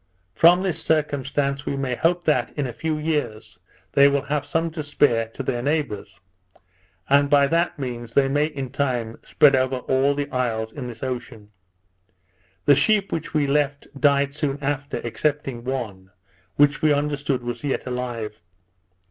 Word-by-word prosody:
From 175 - +5
this 170 -4 -1
circumstance 145 -2 -1
we 140 - -1
may 135 -2 -1
hope 175 +7 +1
that, 150 - +1
in 145 - 0
a 125 - -5
few 155 -1 -2
years, 150 -8 -3 0.3
they 140 0 +6
will 140 -1 +1
have 145 0 -2
some 165 +2 -1
to 160 -1 -5
spare 145 -6 +2
to 115 +4 -7
their 120 -2 -2
neighbours; 140 -9 -2 0.9
and 140 +1 +4
by 140 -1 +5
that 170 +4 0
means 120 -4 -6
they 140 -1 +4
may 145 +2 +1
in 135 -5 -6
time 120 -5 -2
spread 145 -2 +4
over 130 0 +1
all 135 +2 +1
the 145 0 -2
isles 115 -4 -1
in 130 -4 -6
this 115 0 -9
ocean. 120 -5 -6 1.1
The 145 - +7
sheep 200 +7 +2
which 160 0 -4
we 150 -2 +3
left 140 0 0
died 140 -1 +3
soon 145 -2 -2
after, 145 0 -3
excepting 135 0 -2
one, 110 -8 -5 0.5
which 145 0 +3
we 155 - +4
understood 145 -3 -1
was 120 +4 -5
yet 140 -2 -2
alive. 120 -5 -4
140 Hz, 165 wpm, -23 LUFS, 125-150 Hz, 1.1 s, The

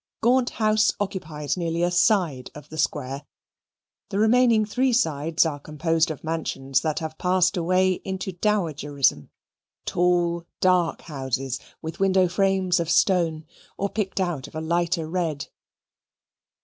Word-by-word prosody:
Gaunt 250 +2 +3
House 215 -1 +2
occupies 160 -7 -3
nearly 170 -1 -1
a 175 - +1
side 175 - +2
of 150 -1 -11
the 155 - -9
Square. 140 -1 -2 0.8
The 195 - -3
remaining 225 0 +4
three 250 +4 +1
sides 160 -6 +1
are 150 -3 -2
composed 160 +3 0
of 155 - -6
mansions 155 -4 -1
that 155 -2 -2
have 160 -1 -5
passed 185 +1 +2
away 185 +1 +1
into 190 0 -4
dowagerism 150 - 0 0.6
tall, 175 -1 +1
dark 180 -3 +2
houses, 135 -3 -3 0.2
with 160 0 -6
window 190 -1 +3
frames 190 0 +1
of 165 -1 -2
stone, 170 -6 +2 0.3
or 200 - -1
picked 200 -2 -3
out 175 -8 -2
of - - -15
a - - -2
lighter 170 0 0
red. 160 -4 -2
170 Hz, 135 wpm, -24 LUFS, 155-190 Hz, 0.8 s, remaining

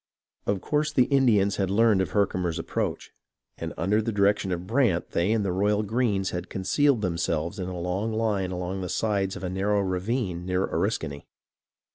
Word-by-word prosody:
Of 100 -2 0
course 150 0 0
the 130 -4 +4
Indians 115 -8 +3
had 95 -2 0
learned 105 -1 +4
of 95 - -1
Herkimer's 90 -4 0
ap 80 - -5
proach, - - -3 0.5
and - - -4
under 105 +5 +2
the 115 +1 -2
direction 100 -1 +2
of 90 0 -3
Brant 110 -5 +1
they 85 +5 +1
and 110 -2 +1
the 95 - 0
Royal 105 +3 +1
Greens 105 -3 0
had 90 - -5
concealed 120 +6 +1
themselves 85 0 -1
in 90 - -3
a 90 -1 -5
long 95 +6 -2
line 110 -4 0
along 90 +1 -3
the 90 - -4
sides 100 -2 0
of - - -8
a - - -1
narrow 100 +2 +1
ravine 95 0 -2
near 90 +1 0
Oriskany. 70 0 -2
100 Hz, 185 wpm, -26 LUFS, 90-110 Hz, 0.5 s, the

